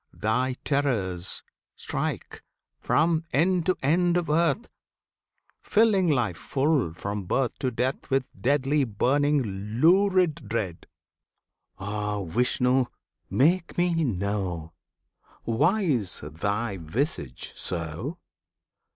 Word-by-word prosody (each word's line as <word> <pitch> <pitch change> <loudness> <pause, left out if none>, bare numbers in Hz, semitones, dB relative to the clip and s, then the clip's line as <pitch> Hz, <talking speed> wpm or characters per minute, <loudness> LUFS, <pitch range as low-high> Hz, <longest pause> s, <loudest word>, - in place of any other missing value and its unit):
Thy 125 +4 0
terrors 105 - 0 0.3
strike - - -4 0.4
From 160 +1 +2
end 175 +3 +2
to 185 - +3
end 175 +5 +3
of 170 -3 -1
earth, 170 - +2 0.9
Filling 210 -5 +3
life 120 - +1
full, 135 - 0
from 100 +1 -4
birth 125 +6 0
To 130 - 0
death, 125 +2 -2
with 135 -1 +1
deadly, 140 +2 +1
burning, 140 +5 +2 0.4
lurid 185 0 +3
dread! 100 -7 -3 0.9
Ah, 105 0 -3
Vishnu! 125 +6 +2 0.4
make 170 +6 +2
me 175 -2 +2
know 95 - -2 0.7
Why 150 - +2
is 120 - 0
Thy 100 +7 -2
visage 80 - -3
so? 85 - -4
130 Hz, 100 wpm, -26 LUFS, 100-160 Hz, 0.9 s, to